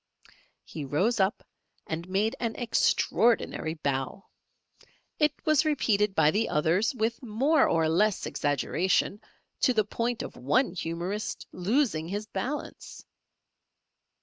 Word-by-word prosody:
He 155 Hz, -, -7 dB
rose 185 Hz, -, 0 dB
up 195 Hz, +4 st, +1 dB, 0.4 s
and 165 Hz, +3 st, -5 dB
made 205 Hz, +4 st, +1 dB
an 230 Hz, -2 st, -2 dB
extraordinary 230 Hz, -7 st, +1 dB
bow. 140 Hz, +4 st, -3 dB, 0.9 s
It 300 Hz, -1 st, +4 dB
was 310 Hz, -3 st, +4 dB
repeated 210 Hz, -10 st, +1 dB
by 150 Hz, -, +4 dB
the 220 Hz, +5 st, 0 dB
others 170 Hz, -, +1 dB
with 230 Hz, 0 st, -1 dB
more 265 Hz, +6 st, +2 dB
or 165 Hz, -1 st, +2 dB
less 200 Hz, +6 st, +1 dB
exaggeration 180 Hz, -, 0 dB, 0.4 s
to 255 Hz, -, +3 dB
the 215 Hz, -1 st, +3 dB
point 235 Hz, +2 st, -2 dB
of -, -, -8 dB
one 250 Hz, -, +1 dB
humourist 175 Hz, +4 st, -4 dB
losing 190 Hz, -, 0 dB
his 205 Hz, +4 st, -4 dB
balance! 250 Hz, +9 st, -6 dB
205 Hz, 120 wpm, -28 LUFS, 165-235 Hz, 0.9 s, It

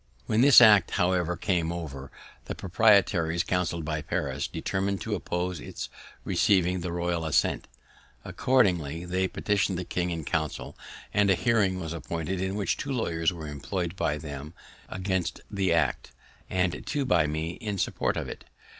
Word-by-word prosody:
When 110 Hz, -, +2 dB
this 135 Hz, -2 st, +9 dB
act 105 Hz, -6 st, +7 dB
however 90 Hz, -2 st, +1 dB
came 85 Hz, -2 st, 0 dB
over, 70 Hz, -6 st, -6 dB, 0.3 s
the -, -, -5 dB
proprietaries, 95 Hz, -4 st, +3 dB
counselled 85 Hz, -3 st, -1 dB
by 75 Hz, -1 st, -2 dB
Paris, 70 Hz, -1 st, -2 dB
determined 95 Hz, 0 st, -2 dB
to -, -, -3 dB
oppose 90 Hz, 0 st, -2 dB
its -, -, -7 dB, 0.3 s
receiving 90 Hz, -2 st, +2 dB
the 85 Hz, 0 st, -3 dB
royal 85 Hz, -1 st, -1 dB
assent. 80 Hz, -, +1 dB, 0.6 s
Accordingly 90 Hz, -, +1 dB
they 95 Hz, +1 st, 0 dB
petitioned 95 Hz, -1 st, 0 dB
the 90 Hz, -, -4 dB
king 90 Hz, 0 st, -2 dB
in 80 Hz, -3 st, -4 dB
Council, 80 Hz, -2 st, -3 dB, 0.4 s
and 100 Hz, -1 st, +3 dB
a 95 Hz, -, +5 dB
hearing 100 Hz, -4 st, +1 dB
was 80 Hz, -2 st, -4 dB
appointed 85 Hz, +2 st, -4 dB
in 95 Hz, +1 st, -2 dB
which 105 Hz, -2 st, 0 dB
two 140 Hz, -, -4 dB
lawyers 85 Hz, -10 st, 0 dB
were 80 Hz, -3 st, -7 dB
employ'd 85 Hz, +5 st, -4 dB
by 75 Hz, -5 st, 0 dB
them 75 Hz, +1 st, -8 dB, 0.3 s
against 95 Hz, -1 st, -2 dB
the 95 Hz, -3 st, 0 dB
act, 75 Hz, -7 st, +1 dB, 0.4 s
and 90 Hz, -4 st, 0 dB
two 145 Hz, -2 st, -1 dB
by 85 Hz, -10 st, +3 dB
me 80 Hz, +2 st, -2 dB
in 105 Hz, -3 st, -3 dB
support -, -, -1 dB
of -, -, -3 dB
it. -, -, -8 dB
90 Hz, 160 wpm, -27 LUFS, 80-95 Hz, 0.6 s, this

